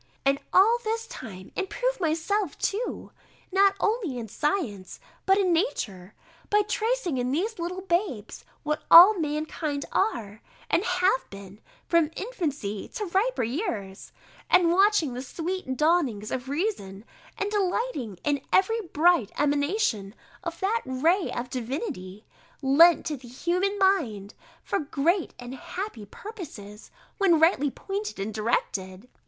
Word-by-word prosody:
And 275 0 +3
all 445 +6 +5
this 450 +1 -2
time 190 - -10
improve - - -2
myself 335 +2 -1
too, 445 +5 -3 0.4
not 390 +1 +4
only 415 - 0
in 230 -2 -5
science, 230 - -2 0.3
but 385 0 +5
in 375 -3 +2
nature, 210 - -2 0.3
by 415 0 +4
tracing 440 - -1
in 250 +1 -1
the 340 +9 +1
little 355 +2 -3
babes 345 - -2 0.2
what 300 0 -1
all 365 +4 +10
mankind 300 -1 -2
are, 220 - -1 0.3
and 355 - +3
have 365 +6 +1
been, 200 +1 -11 0.2
from 335 -3 +3
infancy 295 - -4
to 425 - -2
riper 400 - 0
years, 225 - -4 0.4
and 355 -2 +5
watching 385 - +3
the 250 - -5
sweet 325 0 -4
dawnings 300 -10 +1
of 260 0 -4
reason, 275 - -3 0.3
and 405 +1 -2
delighting 380 - -1
in 285 -2 0
every 450 +4 +3
bright 335 - +2
emanation 285 - 0 0.3
of 335 0 -5
that 435 +4 +1
ray 320 +9 +1
of 245 +1 -5
divinity, 240 - -5 0.4
lent 320 +6 +6
to 300 -2 -2
the 250 -1 -14
human 360 +10 -1
mind, 260 - +1 0.3
for - - -1
great 315 +5 0
and 245 +1 -8
happy 265 - -6
purposes, 230 - -10 0.3
when 355 -5 +4
rightly 320 -3 +4
pointed 400 - -5
and 205 +3 -3
directed. 200 -2 -2
325 Hz, 135 wpm, -26 LUFS, 245-390 Hz, 0.4 s, all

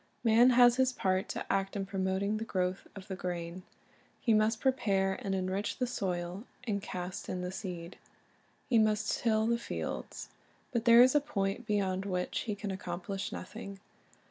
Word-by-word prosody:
Man 235 +2 +6
has 245 0 +7
his 260 -1 +3
part 190 -5 0
to - - -4
act 195 0 -1
in 195 -1 -2
promoting 195 +2 -1
the 220 - -3
growth 185 -3 -2
of 195 -2 -9
the 190 - -4
grain. 175 -1 -4 0.6
He 230 - +2
must 215 +1 +3
prepare 195 -8 +1
and 195 -1 -1
enrich 190 +2 -2
the 255 - +1
soil 185 -3 -3 0.2
and 205 -5 -1
cast 185 0 -5
in 180 - -3
the 180 - -3
seed. 180 -3 -6 0.7
He 235 -3 +4
must 215 0 +2
till 220 -2 +2
the 235 +1 +1
fields. 80 - -5 0.4
But 235 -1 -1
there 235 0 +9
is 255 - +4
a 295 - +4
point 215 -5 -2
beyond 195 -3 0
which 180 -2 -1
he 210 - 0
can 205 0 -4
accomplish 190 +1 -4
nothing. 200 0 -7
195 Hz, 170 wpm, -32 LUFS, 185-225 Hz, 0.7 s, there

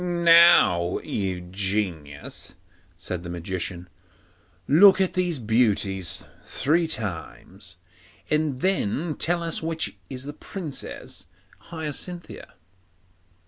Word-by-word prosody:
'Now, 170 - +5
you 95 -3 -3
genius,' 90 -6 -4 0.4
said 90 -2 -4
the 85 - -8
Magician, 85 +1 -4 0.8
'look 190 +6 +7
at 190 -1 +1
these 180 -3 0
beauties 105 -6 0 0.2
three 160 +5 +1
times, 95 - -6 0.5
and 150 -4 0
then 170 - 0
tell 170 +3 -1
us 165 -1 -3
which 160 -10 -4
is 130 -1 -6
the 145 +1 -6
Princess 160 -2 -7 0.4
Hyacinthia. 165 - -6
130 Hz, 95 wpm, -25 LUFS, -, 0.8 s, look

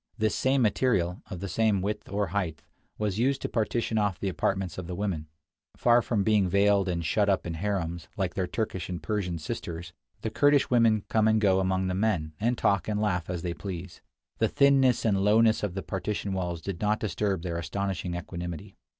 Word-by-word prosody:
This 110 0 +1
same 130 0 +2
material, 100 -5 +1
of 90 - -6
the 100 - -3
same 105 +1 +2
width 105 +3 -3
or 100 -2 -1
height, 90 -5 -2 0.3
was 105 -1 -1
used 135 +3 +2
to - - 0
partition 110 0 0
off 100 -4 0
the 100 - -1
apartments 95 -1 -1
of 90 - -6
the 90 - -4
women. 90 -6 -2 0.5
Far 120 0 +5
from 110 -4 0
being 105 -3 +3
veiled 100 0 +3
and 85 -2 -2
shut 100 +5 +2
up 95 - +1
in 85 - -3
harems, 85 -2 -2
like 95 -3 -1
their 95 -2 -1
Turkish 105 -5 -3
and 90 -2 -5
Persian 100 -6 -2
sisters, 85 +2 -6 0.3
the 110 - -3
Kurdish 145 +1 +3
women 115 -4 +4
come 110 -1 +2
and 110 0 +4
go 95 -3 +3
among 95 0 +1
the 90 - -1
men, 90 -6 0
and 120 +3 +1
talk 100 -3 +1
and 105 -1 -1
laugh 90 -6 0
as 90 -2 -3
they 85 -1 -2
please. 90 -1 -7 0.4
The - - +3
thinness 135 -4 +4
and 100 -3 +2
lowness 110 +2 +4
of 100 -4 -3
the 95 - -3
partition 100 +1 -3
walls 90 -3 -3
did 95 -4 -5
not 105 0 +1
disturb 100 -3 -1
their 85 -2 -2
astonishing 90 +1 -3
equanimity. 85 +1 -6
100 Hz, 200 wpm, -28 LUFS, 90-110 Hz, 0.5 s, Far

